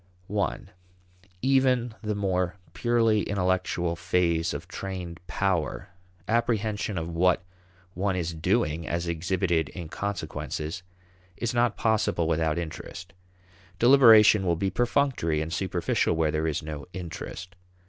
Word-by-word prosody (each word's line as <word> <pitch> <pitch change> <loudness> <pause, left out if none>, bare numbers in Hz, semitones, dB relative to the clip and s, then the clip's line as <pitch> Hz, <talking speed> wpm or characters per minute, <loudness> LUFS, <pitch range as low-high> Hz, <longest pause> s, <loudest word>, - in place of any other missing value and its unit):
(i) 100 -3 +1 0.9
Even 130 -3 +3
the 105 -1 -2
more 90 -3 0 0.2
purely 115 -3 +2
intellectual 90 -3 0
phase 85 -1 +1
of - - -6
trained 90 -3 -6
power 90 -8 -1 0.4
apprehension 110 -3 0
of 80 0 -2
what 90 +2 +2 0.5
one 95 +1 0
is 85 -2 -2
doing 80 0 0
as 85 +1 -2
exhibited 85 -1 0
in 85 -3 -7
consequences 90 -4 -4 0.6
is 120 - -2
not 120 -2 +2
possible 110 -7 +1
without 80 -1 +1
interest. 85 +1 -6 0.6
Deliberation 115 -5 +7
will 85 -2 +2
be 95 +3 -1
perfunctory 120 - +1
and 80 +1 -3
superficial 90 -2 0
where 80 -1 +1
there 80 +1 0
is 80 0 -2
no 75 -3 -6
interest. 90 0 -7
90 Hz, 120 wpm, -27 LUFS, 85-105 Hz, 0.9 s, Deliberation